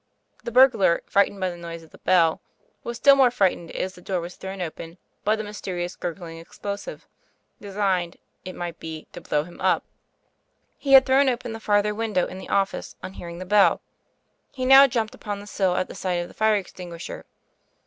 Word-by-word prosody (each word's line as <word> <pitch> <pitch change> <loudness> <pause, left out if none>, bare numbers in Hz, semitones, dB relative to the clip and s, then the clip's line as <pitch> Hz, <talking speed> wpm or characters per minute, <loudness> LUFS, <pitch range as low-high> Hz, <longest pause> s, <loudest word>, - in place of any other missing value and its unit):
The 235 - -5
burglar, 230 -9 +5
frightened 200 0 +2
by 185 -1 -1
the 175 - -9
noise 170 -1 -8
of 160 - -18
the - - -16
bell, 170 -3 +3 0.4
was 235 0 -5
still 280 +3 +7
more 265 -2 +5
frightened, 190 -8 0
as 185 - -4
the 180 - -15
door 185 0 -2
was 175 +1 -7
thrown 190 0 -7
open, 165 0 -6 0.3
by 215 - +2
the 215 - -4
mysterious 185 -4 -5
gurgling 165 -1 -6
cx - - -19
flosive, 205 - -5 0.6
designee!, 190 -4 -1 0.3
it 185 - -8
might 175 -2 -6
be, 160 -1 -7
to - - -8
blow 150 - 0
him 175 +2 -13
up. - - +2 1.0
le 275 -1 +2
had 265 -1 +9
thrown 270 +1 +4
open 240 -2 -3
the 225 - -7
farther 210 -1 +2
window 210 -4 0
in 185 - -8
the - - -10
office 195 -1 -1
on 190 - -6
hearing 170 -2 -8
the 185 - -7
bell; 205 +1 +4 0.7
he 255 -1 -4
now 270 +1 +9
jumped 230 -4 -2
upon 205 -1 -5
the 205 - -10
sill 190 -3 0
at 185 - 0
the - - -9
sight 185 -1 -2
of 175 0 -2
the - - -15
fire 220 0 +3
extinguisher. 180 -3 -7
195 Hz, 200 wpm, -24 LUFS, 175-220 Hz, 1.0 s, had